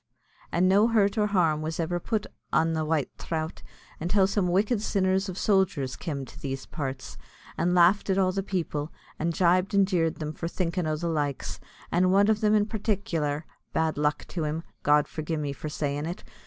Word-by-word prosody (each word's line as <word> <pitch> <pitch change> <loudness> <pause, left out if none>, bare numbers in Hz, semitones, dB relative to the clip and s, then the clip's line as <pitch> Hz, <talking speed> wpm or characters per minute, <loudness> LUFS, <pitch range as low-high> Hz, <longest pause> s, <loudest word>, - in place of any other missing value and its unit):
and 180 +2 +3
no 200 +4 +5
hurt 210 -4 +3
nor 210 -2 +2
harm 165 -7 +2
was 160 +1 -4
iver 175 +1 0
put 215 +3 -2 0.3
an 165 +1 +2
the 160 -1 0
white 155 -3 0
throut, 160 -1 -4 0.4
until 190 +4 +3
some 195 -1 +1
wicked 205 +5 +2
sinners 190 -2 +1
of 185 - -6
sojers 190 -12 +1
kem 140 -6 -4
to - - -13
these 135 -1 -4
parts, 135 -4 -5 0.4
and 180 +2 +1
laughed 180 +4 +4
at 190 - +2
all 185 -1 +3
the 195 +1 -1
people, 165 -6 -3 0.3
and 170 +2 0
gibed 185 +2 +3
and 200 -1 +5
jeered 165 -4 +1
them 155 -1 -5
for 165 - -4
thinkin' 175 -1 -1
o' 155 - 0
the 170 +3 -3
likes; 145 -4 -2 0.3
and 185 +2 +3
one 200 +2 +5
o' - - +6
them 215 0 +2
in 205 -1 +3
partic'lar 180 -9 -1 0.3
(bad 160 -1 +1
luck 150 +1 0
to 170 - -3
him; 155 +2 -2 0.2
God 150 0 +4
forgi' 160 +1 -3
me 145 -2 -2
for 155 - -6
saying 145 0 -2
it!) 175 - -6
170 Hz, 195 wpm, -27 LUFS, 155-195 Hz, 0.4 s, o